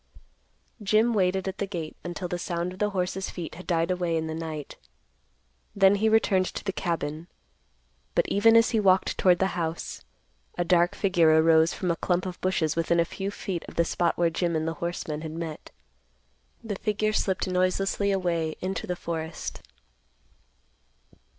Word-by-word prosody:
Jim 215 +3 +3
waited 190 -2 +1
at 190 - -4
the 200 - -1
gate 170 -5 -5
until 175 +1 -4
the 175 0 -3
sound 175 +1 -3
of 185 - -13
the 210 - +1
horse's 190 0 -2
feet 170 -3 -6
had 185 +3 -11
died 170 0 +1
away 175 -2 0
in 160 - -1
the 160 - -4
night. 160 -2 -6 1.0
Then 195 -1 +6
he 215 +2 +2
returned 195 -4 +3
to - - -6
the 195 - -2
cabin. 165 -2 -3 0.9
But - - +2
even 225 +3 +4
as 230 - +4
he 225 - +2
walked 190 -2 +3
toward 180 -2 +4
the 190 +1 0
house, 165 -1 -4 0.6
a 175 - 0
dark 175 0 +3
figure 175 -5 +3
arose 160 +1 +4
from 180 -2 -1
a - - 0
clump 180 +1 0
of 180 -1 -6
bushes 165 -5 0
within 170 +1 +1
a 170 - +4
few 195 +3 -4
feet 190 -3 -4
of - - -11
the 170 - +2
spot 170 0 0
where 170 -1 +2
Jim 170 0 -1
and 160 0 -1
the 165 - -1
horseman 165 -3 -3
had 160 -1 -6
met. 160 -2 -6 0.9
The 225 -2 -3
figure 215 0 0
slipped 190 -2 0
noiselessly 185 +2 +1
away 170 -4 0
into 195 +3 -3
the 180 - -1
forest. 160 -1 -5
180 Hz, 175 wpm, -27 LUFS, 165-195 Hz, 1.0 s, Then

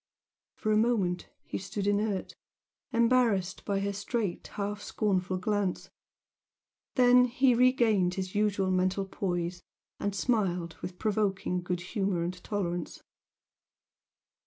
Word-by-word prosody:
For 215 - -1
a 215 - +4
moment 210 -6 +1
he - - -5
stood 195 +1 -4
inert, 205 -1 0 0.6
embarrassed 230 -6 +2
by 200 -1 0
her 200 0 -1
straight, 200 -1 -2
half 205 0 -4
scornful 185 -4 0
glance 200 -1 -1 1.0
then 250 0 +6
he 250 +1 +3
regained 230 -7 +3
his 185 -1 -4
usual 205 -2 +1
mental 185 +1 +1
poise 175 -2 -3 0.4
and 200 -1 -2
smiled 185 -7 0
with 180 0 -6
provoking 195 -4 0
good 175 0 -2
humour 190 -2 -1
and 180 +1 -5
tolerance. 175 -5 -3
200 Hz, 115 wpm, -29 LUFS, 180-215 Hz, 1.0 s, then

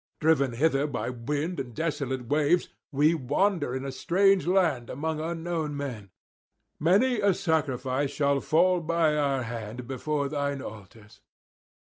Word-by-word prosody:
Driven 150 -5 +2
hither 140 +2 +2
by 135 -3 -3
wind 145 +8 -3
and 120 -4 -6
desolate 140 -6 -2
waves, 150 +5 +2 0.2
we 150 +3 +3
wander 160 +1 0
in 130 +1 -4
a 135 - -3
strange 190 +7 +2
land 170 -10 +2
among 155 +3 -3
unknown 165 -2 -3
men. 120 -8 -5 0.7
Many 210 +8 +3
a 200 -2 +3
sacrifice 140 -5 0
shall 140 -1 +1
fall 180 +3 +3
by 165 -1 +1
our 140 -3 +1
hand 115 +1 -6
before 140 +2 -2
thine 140 -1 -2
altars.' 105 -3 -11
145 Hz, 135 wpm, -27 LUFS, 130-165 Hz, 0.7 s, we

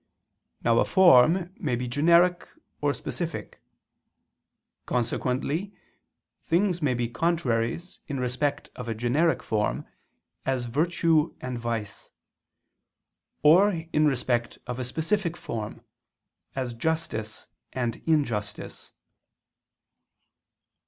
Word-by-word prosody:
Now 115 0 +4
a - - +5
form 175 0 +5
may 150 - 0
be 125 +1 -3
generic 170 +7 +3 0.3
or 145 -1 +2
specific. 170 +3 -5 1.3
Consequently 130 - -1 0.7
things 175 +1 +1
may 135 -4 +1
be 120 0 -1
contraries 125 +2 -1
in 140 -3 -3
respect 140 +4 -1
of 125 - -7
a 115 - -2
generic 135 +9 +1
form, 105 -2 -1 0.6
as 130 -2 -1
virtue 160 +4 +1
and 125 -1 -4
vice; 115 -3 -4 1.3
or 175 +7 +7 0.2
in 155 0 +4
respect 120 -3 0
of 125 +1 -5
a - - -1
specific 170 - -1
form, 110 -8 -6 0.7
as 130 -3 -2
justice 115 -5 -3 0.3
and 120 -3 -3
injustice. 140 -10 -2
135 Hz, 100 wpm, -26 LUFS, 120-165 Hz, 1.3 s, or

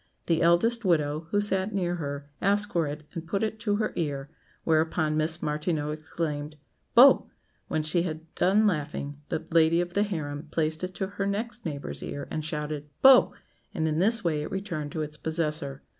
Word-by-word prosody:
The 165 -1 +1
eldest 200 +8 +3
widow, 155 -3 +1
who 205 - +2
sat 200 0 0
near 175 -2 0
her, 145 -2 -5
asked 205 +1 +2
for 170 -4 +1
it 150 +1 -6
and 165 -2 -6
put 200 +5 -1
it 220 0 -2
to 210 -2 0
her 215 0 -1
ear; 145 -3 -3 0.3
whereupon 160 -1 +1
Miss 160 +2 0
Martineau 150 0 -1
exclaimed, 150 -1 -4 0.4
"Bo!" - - +7 0.4
When 155 - -1
she 155 +3 +1
had 160 -1 -5
done 205 +4 +3
laughing, 145 -5 -2
the 160 - -3
lady 165 0 +4
of 175 0 -2
the 200 - +2
harem 155 -7 -3
placed 160 +1 -1
it 185 0 -4
to 190 - -1
her 195 0 -3
next 225 +2 -3
neighbour's 145 -3 -5
ear, 140 -1 -5
and 155 - -2
shouted 150 -1 -3
"Bo!" 265 -1 +8 0.4
and 160 - 0
in 155 0 0
this 225 +5 +2
way 155 -4 0
it 150 - -4
returned 170 -7 -4
to 155 - -1
its 150 0 -7
possessor. 150 -4 -2
160 Hz, 190 wpm, -27 LUFS, 150-190 Hz, 0.4 s, Bo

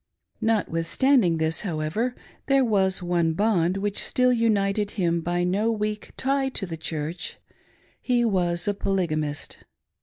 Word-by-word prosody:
Notwithstanding 205 0 +2
this, 160 0 0
however, 180 +8 -2 0.3
there 275 -1 +4
was 190 -4 +1
one 170 -2 +1
bond 185 -2 +1
which 205 0 0
still 250 0 +2
united 210 -3 +1
him 170 -3 +1
by 175 +1 -1
no 200 +6 +1
weak 210 -1 -3
tie 270 0 +1
to 220 - -4
the 170 -3 -5
Church 160 +1 -4 0.7
^he 245 -2 +2
was 175 -5 0
a 205 - +2
Polygamist. 155 -7 -2
195 Hz, 130 wpm, -25 LUFS, 170-225 Hz, 0.7 s, there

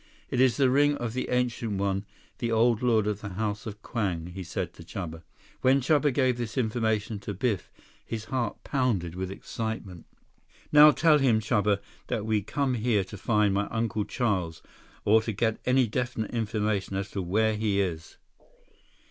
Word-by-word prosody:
"It 125 - +2
is 130 -3 +4
the 135 -3 +4
ring 145 +2 +3
of 120 -2 -3
the 130 - -3
Ancient 120 -3 0
One, 100 +1 -1 0.3
the 120 -1 -1
Old 115 0 +3
Lord 115 -4 +3
of 105 0 -2
the 105 - -5
House 105 +2 -3
of 105 0 -8
Kwang," 90 -7 -2
he 95 0 -6
said 90 - -4
to - - -12
Chuba. 85 -1 -6 0.4
When 130 +2 +4
Chuba 145 +2 +3
gave 130 -2 +1
this 120 +1 -4
information 110 -3 0
to 100 0 -6
Biff, 110 -8 -1 0.3
his 110 -1 -5
heart 125 -5 -3
pounded 115 - 0
with 95 +1 -4
excitement. 100 -3 -6 0.6
"Now 150 0 +9
tell 155 0 +4
him, 125 -5 +3
Chuba, 105 -2 +1 0.3
that 105 - -2
we 110 -1 +1
come 135 +5 -1
here 110 -4 +1
to 95 - -10
find 105 0 +2
my 100 +1 0
Uncle 115 -2 -1
Charles, 95 -10 -1 0.4
or 110 +2 +5
to 110 - -3
get 110 +2 0
any 130 0 +4
definite 120 -1 -2
information 105 -4 -1
as 100 +1 -4
to 100 - -3
where 110 +5 +1
he 105 -2 0
is." 85 -4 -3
110 Hz, 175 wpm, -27 LUFS, 100-125 Hz, 0.6 s, Now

